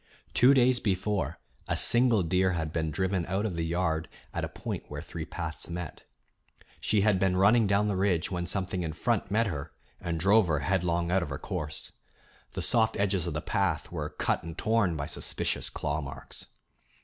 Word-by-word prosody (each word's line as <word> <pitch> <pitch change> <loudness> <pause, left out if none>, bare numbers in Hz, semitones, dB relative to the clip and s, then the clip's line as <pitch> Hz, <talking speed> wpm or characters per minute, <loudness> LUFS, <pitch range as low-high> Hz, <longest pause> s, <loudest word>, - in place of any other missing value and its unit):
Two 130 +3 +6
days 125 -1 +5
before, 95 - -1 0.3
a - - 0
single 120 -4 +4
deer 90 +2 +2
had 80 -2 -2
been 80 -2 0
driven 95 +3 0
out 95 +3 0
of 100 -5 -2
the 85 - -1
yard 80 -1 0 0.2
at - - -2
a - - -2
point - - -5
where - - -6
three - - -6
paths 80 -1 -6
met. 85 -2 -6 0.7
She 105 -2 +2
had 100 -2 +3
been 95 -1 +2
running 105 +3 +5
down 100 +1 +3
the 100 - 0
ridge 95 -3 +1
when 90 -1 -2
something 95 -1 -1
in 80 -2 -3
front 105 +3 0
met 110 +3 +2
her 75 -8 -4 0.3
and 85 -1 -3
drove 100 +3 +5
her 75 -4 +1
headlong 85 +1 0
out 95 +1 +3
of 85 - -3
her 70 - -3
course. 75 0 -4 0.6
The - - -3
soft 110 -1 +2
edges 95 -3 +1
of 80 - -3
the 75 - -1
path - - 0
were - - -3
cut - - -1
and 85 -1 -8
torn 110 -6 +2
by 70 - -2
suspicious - - -2
claw 75 +2 -2
marks. 70 -1 -9
90 Hz, 195 wpm, -29 LUFS, 80-100 Hz, 0.7 s, Two